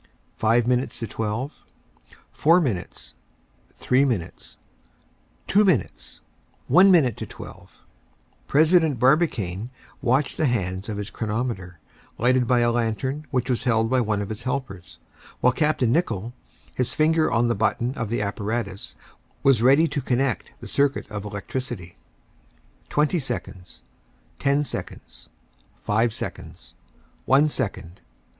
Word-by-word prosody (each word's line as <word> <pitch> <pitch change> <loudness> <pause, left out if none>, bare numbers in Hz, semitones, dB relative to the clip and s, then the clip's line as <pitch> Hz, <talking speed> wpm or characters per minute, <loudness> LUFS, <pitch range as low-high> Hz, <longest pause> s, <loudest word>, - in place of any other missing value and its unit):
Five 115 +2 +2
minutes 125 +1 0
to - - -1
twelve, 115 +6 -4 0.7
four 165 +4 +4
minutes, 115 - -4 0.6
three 130 +2 +2
minutes, 115 -12 -3 0.9
two 205 +2 +4
minutes, 100 - -1 0.5
one 185 +8 +6
minute 145 - +4
to - - -6
twelve - - -12 0.7
President 160 -1 +4
Barbicane 120 - +1 0.3
watched 135 +2 +1
the 155 - +2
hands 95 -4 -2
of 105 - -4
his 105 0 -5
chronometer, 110 -5 -3 0.4
lighted 125 +1 +2
by 125 -1 +3
a 120 0 +3
lantern 120 +6 -2
which 125 -2 -1
was 125 -1 -1
held 115 -1 +2
by 130 -1 +3
one 105 -3 -1
of 100 - -7
his 110 +1 -5
helpers, 125 -10 -5 0.4
while 125 - +3
Capt. 150 -1 +1
Nicholl, 115 - 0 0.4
his 125 -1 -2
finger 155 +1 +2
on 120 +1 +2
the 120 - +2
button 115 +3 0
of 120 -6 -4
the 115 -2 -1
apparatus, 100 0 -4 0.5
was 135 -5 +4
ready 140 +7 +5
to 145 - -2
connect 125 -1 -1
the - - -8
circuit 140 0 0
of 100 -1 -5
electricity. 100 -3 -5 0.9
Twenty 150 +4 +1
seconds, 120 - -6 0.6
ten 140 +2 +1
seconds, - - -8 0.5
five 110 +3 +2
seconds, - - -8 0.5
one 140 +3 +5
second. 95 - -4
120 Hz, 130 wpm, -24 LUFS, 105-140 Hz, 0.9 s, one